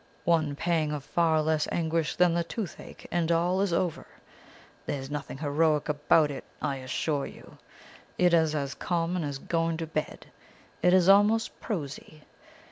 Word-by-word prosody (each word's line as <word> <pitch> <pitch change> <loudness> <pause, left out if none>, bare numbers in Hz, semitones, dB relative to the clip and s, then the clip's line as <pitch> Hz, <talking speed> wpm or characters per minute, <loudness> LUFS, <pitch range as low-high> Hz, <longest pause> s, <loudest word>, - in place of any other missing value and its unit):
One 155 -4 +2
pang 160 -1 0
of 145 -2 -4
far 160 +1 +2
less 155 -1 +1
anguish 165 -1 0
than 180 -1 +4
the 170 0 +1
toothache, 195 +2 -7
and 170 -1 +1
all 175 +3 +2
is 200 -2 +1
over. 170 -1 -1 0.8
There 145 - -2
is 135 +1 -8
nothing 145 -2 -5
heroic 150 +1 +1
about 150 +1 +3
it, 140 - -6 0.2
I 140 - -2
assure 135 +2 -2
you! - - -14 0.6
It 180 -1 +3
is 160 -2 +3
as 140 -2 -2
common 175 +1 -1
as 145 -2 -3
going 165 +3 -1
to 165 - -3
bed; 155 -1 -4 0.6
it 180 - +4
is 185 -1 +4
almost 205 +3 +4
prosy. 155 -4 -6
160 Hz, 160 wpm, -28 LUFS, 150-175 Hz, 0.8 s, than